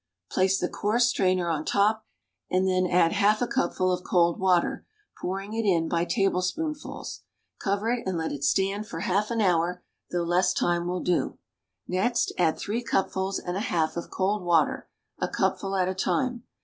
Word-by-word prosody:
Place 190 +1 +2
the 180 - 0
coarse 225 +6 +1
strainer 185 -6 +1
on 160 -2 -1
top, 215 +5 +1 0.4
and 185 +1 +2
then 185 -1 +2
add 175 -2 +3
half 210 +1 +3
a 245 - +1
cupful 185 -8 0
of 180 0 -2
cold 170 -1 +2
water, 185 -2 +2 0.4
pouring 195 +3 -4
it 225 0 -1
in 170 -5 +2
by 170 0 0
tablespoonfuls. 230 - -2 0.4
Cover 200 +3 0
it 240 -5 -2
and 185 -2 -1
let 160 -1 -2
it 140 -1 -5
stand 195 +2 +1
for 165 - -6
half 200 +4 0
an 230 -1 0
hour, 180 -1 +1 0.3
though 175 -1 -1
less 180 +2 +2
time 175 0 +1
will 180 0 -2
do. 180 - 0 0.5
Next 195 +7 0
add 165 -3 +3
three 220 +4 -2
cupfuls 190 -2 0
and 175 - -4
a - - -1
half 175 -9 0
of 170 - -5
cold 195 +1 -1
water, 165 -4 +1 0.3
a - - 0
cupful 195 0 -1
at 185 -1 +2
a 185 - -1
time. 245 +5 -1
185 Hz, 180 wpm, -26 LUFS, 175-210 Hz, 0.5 s, add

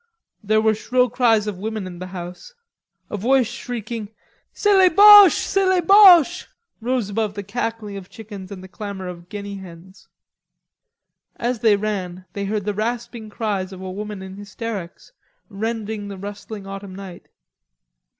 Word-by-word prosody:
There 215 +1 +2
were 220 0 +3
shrill 250 +3 0
cries 230 -4 +2
of 205 -3 -5
women 215 -1 -4
in 175 -2 -9
the 185 - -6
house. 180 - -9 0.6
A 210 - -3
voice 255 +5 +3
shrieking, 225 -2 -6 0.4
"C'est 415 -1 +2
les 375 -1 +6
Boches, 410 0 +9
C'est 390 -1 0
les 375 -1 +3
Boches," 355 -2 +6 0.3
rose 240 -3 -1
above 210 -1 -2
the 205 - -5
cackling 215 -1 -4
of 185 -2 -10
chickens 205 -3 -10
and 190 -2 -8
the - - -10
clamor 200 -1 -7
of 175 0 -9
guinea 200 -1 -6
hens. 185 +1 -13 1.3
As 240 0 -2
they 215 -2 +4
ran, 190 -3 -4
they 200 -1 -4
heard 205 0 -2
the 210 - -1
rasping 230 +1 -4
cries 205 -4 -3
of 190 - -9
a 190 0 -6
woman 205 0 -6
in 190 0 -9
hysterics, 205 -3 -7 0.4
rending 220 0 -4
the 200 -1 -7
rustling 205 +1 -8
autumn 195 -1 -8
night. 190 -3 -10
210 Hz, 160 wpm, -21 LUFS, 195-230 Hz, 1.3 s, Boches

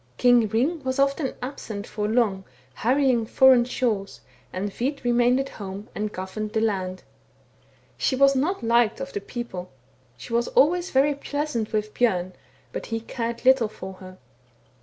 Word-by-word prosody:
"King 245 -3 +4
Hring 275 +9 0
was 260 0 -2
often 275 0 +1
absent 220 -6 -6
for 210 -1 -3
long, 215 -4 +1 0.3
harrying 250 - +2
foreign 255 0 +6
shores, 225 -6 -2 0.3
and 200 +2 -3
Hvit 270 +7 -3
remained 245 +1 +3
at 270 0 -2
home 200 +1 -8
and 210 0 -3
governed 210 +3 -5
the 220 - +2
land. 190 -4 -1 1.0
She 260 - +1
was 275 +1 +5
not 300 +3 0
liked 235 0 +3
of 270 0 -6
the 200 - -3
people. 200 -5 -6 0.5
She 130 - -9
was 235 +1 +2
always 350 +5 +3
very 275 +2 +3
pleasant 285 -5 -3
with 215 -1 -2
Bjorn, 185 -6 +1 0.4
but - - -6
he 225 0 -2
cared 235 +1 -4
little 260 -3 +5
for 190 -2 -8
her. 185 0 -11
235 Hz, 160 wpm, -25 LUFS, 210-265 Hz, 1.0 s, foreign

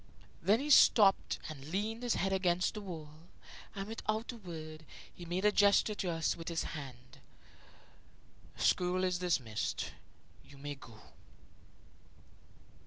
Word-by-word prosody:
Then 205 +7 +4
he 295 +2 -2
stopped 205 -7 +6
and 140 -3 -8
leaned 215 +6 -2
his 245 -2 0
head 195 0 0
against 180 -2 +1
the 210 - -6
wall, 165 -6 -7 0.6
and, 195 0 -4
without 220 +1 -3
a 240 - -10
word, 160 -5 -8 0.3
he 175 - -10
made 180 +4 -2
a 210 - +6
gesture 205 +1 +4
to 195 -3 -3
us 165 -1 0
with 165 - -9
his 170 -1 -1
hand; 130 -4 -9 1.4
"School 180 +1 +2
is 180 -1 +1
dismissed 135 -12 -1 0.5
you 140 - -16
may 145 +1 -5
go." 115 -5 -14
180 Hz, 135 wpm, -33 LUFS, 155-205 Hz, 1.4 s, stopped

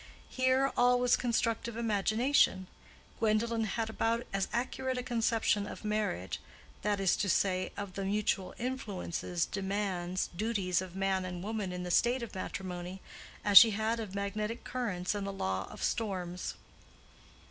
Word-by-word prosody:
Here 260 +1 +2
all 245 0 +4
was 245 -1 +4
constructive 230 -1 -1
imagination. 220 -1 +2 0.5
Gwendolen 225 +1 +1
had 220 +2 -2
about 225 +1 0
as 195 -1 0
accurate 260 +1 -1
a 250 - -2
conception 225 -4 +1
of - - -8
marriage—that 205 - -3
is 195 -2 +3
to 200 - 0
say, 185 0 +1
of 200 -2 -5
the 195 - -3
mutual 195 -1 0
influences, 200 -8 -2
demands, 190 -2 -2
duties 195 -3 0
of 185 -1 -8
man 195 -1 +1
and 180 -1 -5
woman 210 -3 -3
in 180 0 -4
the 180 - -3
state 240 +7 +3
of 235 - -7
matrimony—as 185 +1 +2
she 230 - +7
had 220 +1 0
of 205 -4 -5
magnetic 210 +3 -3
currents 205 -8 -2
and 200 -1 -3
the - - -2
law 95 - -2
of - - -8
storms. 185 -5 -2
205 Hz, 145 wpm, -32 LUFS, 185-230 Hz, 0.5 s, she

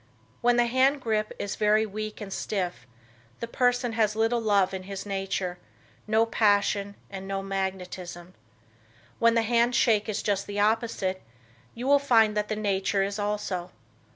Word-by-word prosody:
When 245 0 +4
the 240 - +4
hand 260 +4 +3
grip 215 -4 -1
is 200 - -4
very 215 +1 +3
weak 215 +1 -6
and 195 -2 -6
stiff, 180 - -3 0.5
the - - -3
person 245 0 +1
has 215 -2 +1
little 225 +2 +1
love 200 -4 +2
in 190 - -4
his 195 0 -5
nature, 195 -2 -3 0.5
no 220 +1 +3
passion 205 -2 +1 0.2
and 195 -1 -7
no 195 0 -3
magnetism. 185 -2 -5 0.9
When 230 0 +4
the 230 - +3
hand 235 +1 +2
shake 220 -2 +3
is 210 - -2
just 200 -1 -1
the 205 0 -4
opposite, 210 -3 0 0.5
you 245 - -5
will 285 +1 +5
find 225 -6 +4
that 210 0 0
the 215 - -2
nature 200 -1 0
is 200 +1 -3
also. 205 -4 -2
210 Hz, 160 wpm, -27 LUFS, 195-225 Hz, 0.9 s, will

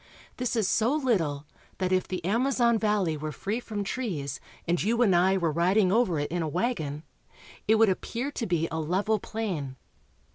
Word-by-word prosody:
This 250 -1 -1
is 220 -4 +1
so 235 +7 +2
little 170 - 0 0.3
that, 185 -1 -1
if 185 0 +1
the 180 -3 -4
Amazon 235 +2 +2
valley 210 -7 +1
were 155 +1 -4
free 205 - -3
from 215 -4 -4
trees 180 - -3 0.3
and 175 0 +1
you 230 +4 +2
and 195 -6 +4
I 190 +2 +4
were 170 -4 +1
riding 180 +4 +3
over 210 -6 +2
it 145 +1 -2
in 175 0 -1
a 160 - -1
wagon, 155 - -2 0.6
it 220 - +5
would 225 0 +5
appear 235 +8 -2
to 240 -5 -3
be 170 -2 +1
a 160 - -2
level 195 +7 0
plain. 180 -13 -4
190 Hz, 185 wpm, -27 LUFS, 165-225 Hz, 0.6 s, it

